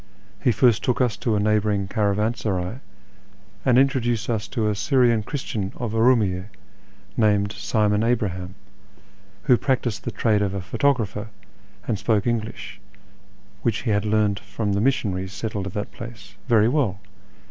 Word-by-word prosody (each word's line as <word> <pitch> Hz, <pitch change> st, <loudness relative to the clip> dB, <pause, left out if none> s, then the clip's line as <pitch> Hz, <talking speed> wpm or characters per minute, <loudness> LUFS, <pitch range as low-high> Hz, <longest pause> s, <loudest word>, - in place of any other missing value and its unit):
He 125 Hz, -, +3 dB
first 120 Hz, -2 st, +3 dB
took 125 Hz, -2 st, +1 dB
us 125 Hz, -5 st, +2 dB
to 115 Hz, -3 st, 0 dB
a -, -, +2 dB
neighbouring 105 Hz, -1 st, +1 dB
caravansaray 105 Hz, 0 st, -1 dB, 0.8 s
and 125 Hz, -2 st, +4 dB
introduced 120 Hz, -5 st, +2 dB
us 110 Hz, -2 st, -2 dB
to 115 Hz, -5 st, -1 dB
a 105 Hz, -, +1 dB
Syrian 120 Hz, +1 st, +3 dB
Christian 105 Hz, -5 st, -4 dB
of 120 Hz, -3 st, -4 dB
Urumiyye, 110 Hz, -6 st, +3 dB, 0.7 s
named 105 Hz, -2 st, +2 dB
Simon 105 Hz, +1 st, +1 dB
Abraham, 95 Hz, -6 st, -1 dB, 0.9 s
who 125 Hz, -, +5 dB
practised 120 Hz, -6 st, -1 dB
the -, -, -2 dB
trade 105 Hz, -3 st, +1 dB
of 100 Hz, -1 st, -1 dB
a -, -, -2 dB
photographer, 110 Hz, -1 st, 0 dB, 0.6 s
and 110 Hz, -4 st, -1 dB
spoke 105 Hz, -3 st, +1 dB
English 115 Hz, -3 st, -3 dB, 0.8 s
(which 115 Hz, -1 st, -1 dB
he 115 Hz, -, 0 dB
had 105 Hz, -1 st, +2 dB
learned 105 Hz, -2 st, +1 dB
from 100 Hz, 0 st, -3 dB
the 100 Hz, -, +1 dB
missionaries 95 Hz, -7 st, 0 dB
settled 105 Hz, -3 st, -3 dB
at 95 Hz, -, -7 dB
that 105 Hz, -, -3 dB
place) 105 Hz, -4 st, -10 dB
very 110 Hz, -3 st, +5 dB
well. 120 Hz, -8 st, +1 dB
105 Hz, 145 wpm, -23 LUFS, 100-120 Hz, 0.9 s, who